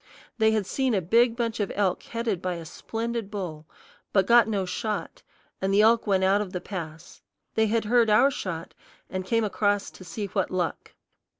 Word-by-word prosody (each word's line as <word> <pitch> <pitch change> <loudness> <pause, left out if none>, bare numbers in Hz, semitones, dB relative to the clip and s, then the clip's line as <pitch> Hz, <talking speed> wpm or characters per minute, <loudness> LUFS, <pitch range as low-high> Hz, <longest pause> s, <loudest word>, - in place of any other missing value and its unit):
They 220 0 +5
had 215 -2 +1
seen 260 +3 0
a - - +3
big 230 +7 +3
bunch 230 -1 -2
of 205 - -1
elk 195 -3 +1
headed 230 -6 -3
by 185 -1 -2
a 170 -1 -7
splendid 225 +5 -4
bull, 170 -7 -6 0.4
but 195 -2 +3
got 235 0 +6
no 200 -4 -1
shot, 210 +3 -4 0.4
and 190 +1 0
the 200 +2 +5
elk 230 +1 +4
went 190 -2 +2
out 195 +2 +3
of 195 -3 -5
the 180 - -2
pass. 165 -4 -8 0.3
They 220 0 +2
had 225 +1 0
heard 235 0 +4
our 240 +7 +5
shot, 170 -9 -5 0.4
and 185 0 -2
came 230 +1 +2
across 205 -1 0
to - - -13
see 205 +3 -5
what 195 -1 -1
luck. 180 -4 -3
205 Hz, 195 wpm, -26 LUFS, 185-225 Hz, 0.4 s, got